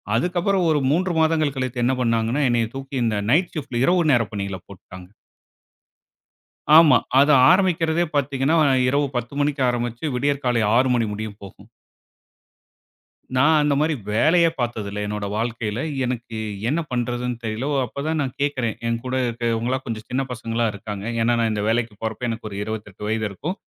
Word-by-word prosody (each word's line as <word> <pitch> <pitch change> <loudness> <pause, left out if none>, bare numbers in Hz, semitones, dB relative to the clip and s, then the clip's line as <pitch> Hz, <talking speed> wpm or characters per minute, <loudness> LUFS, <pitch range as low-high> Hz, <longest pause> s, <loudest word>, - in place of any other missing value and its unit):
அதுக்கப்புறம் 180 - +1
ஒரு 150 - +3
3 180 +4 +1
மாதங்கள் 155 -3 +2
கழித்து 130 -2 -3
என்ன 130 - +2
பண்ணாங்கன்னா, 115 +3 +1
என்னைய 115 -1 +1
தூக்கி 135 0 -7
இந்த 110 -2 0 0.2
நைட் 170 +6 +2
ஷிப்ட் 140 -5 -4
இரவு 180 +4 +3
நேரப் 115 -3 +2
பணியில 100 -2 -4
போட்டுட்டாங்க. 90 -1 -13 1.7
ஆமா, 150 -7 +7 0.2
அது 145 +2 +5 0.2
ஆரம்பிக்கிறதே 175 -3 +2
பாத்தீங்கன்னா, 140 +2 +1 0.3
இரவு 140 +1 +1
10 120 +3 -4
மணிக்கு 145 -1 0
ஆரம்பிச்சு 120 +4 -3
விடியற்காலை 130 -4 0
6 130 +2 +3
மணி 115 - +1
முடியும் 105 0 -6
போகும். 100 - -13 1.7
நான் 150 +4 +4
அந்த 145 -1 +2
மாரி 155 0 +1 0.2
வேலையே 165 +9 +4
பாத்தது 115 -4 -2
இல்ல 105 - -5
என்னோட 105 0 -3
வாழ்க்கையில. 115 -1 -2 0.3
எனக்கு 120 -2 -4 0.3
என்ன 155 - 0
பண்றதுன்னு 120 0 -2
தெரியல. 110 +4 -3 0.2
அப்பதான் 155 +6 -3
நான் 130 -2 -3
கேக்குறேன். 130 -6 -1
என்கூட 115 +2 -3
இருக்கறவங்களா 120 +1 -1
கொஞ்சம் 110 -1 -5
சின்னப் 130 +1 -2
பசங்களா 115 -1 -2
இருக்காங்க. 100 0 -7 0.2
ஏன்னா 120 +1 +2
நான் 115 -1 +1
இந்த 105 -1 -2
வேலைக்குப் 115 -2 -1
போறப்ப 110 +2 -3
எனக்கு 115 -1 -5
ஒரு 100 - -7
28 105 -2 -6
வயது 110 0 -1
இருக்கும். 155 - -5
120 Hz, 150 wpm, -22 LUFS, 115-145 Hz, 1.7 s, ஆமா